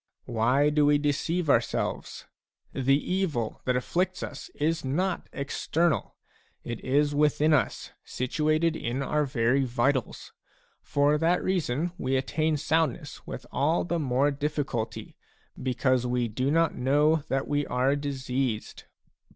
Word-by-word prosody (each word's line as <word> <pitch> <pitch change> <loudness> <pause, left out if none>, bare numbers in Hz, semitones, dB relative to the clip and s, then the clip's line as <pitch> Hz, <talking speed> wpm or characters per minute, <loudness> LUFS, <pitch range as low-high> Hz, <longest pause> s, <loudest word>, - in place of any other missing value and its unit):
Why 125 +6 +2
do 150 -1 +3
we 145 0 +5
deceive 150 +4 -1
ourselves? 140 - 0 0.5
The 135 +1 +3
evil 160 - -2
that 125 - +1
afflicts 180 +8 -1
us 145 - -7
is 160 +2 0
not 175 +8 -1
external, 155 +3 -1 0.5
it 120 -1 -6
is 145 +3 +2
within 150 +1 +3
us, 145 - 0
situated 155 +5 0
in 130 -1 -2
our 150 +2 +1
very 130 +1 +1
vitals; 125 0 -1 0.5
for 145 +1 +2
that 170 +3 +2
reason 170 -3 0
we 130 +1 0
attain 155 +3 0
soundness 155 -2 -1
with - - -7
all 155 +5 +1
the 170 -1 -1
more 140 0 +2
diffi 145 +1 -1
culty, 115 -6 -5 0.5
because 130 0 +1
we 125 -1 0
do 125 +5 -1
not 165 +1 +2
know 145 +5 +3
that 135 0 -1
we 145 -1 0
are 130 +3 +1
diseased. 135 -5 -3
145 Hz, 135 wpm, -27 LUFS, 130-155 Hz, 0.5 s, we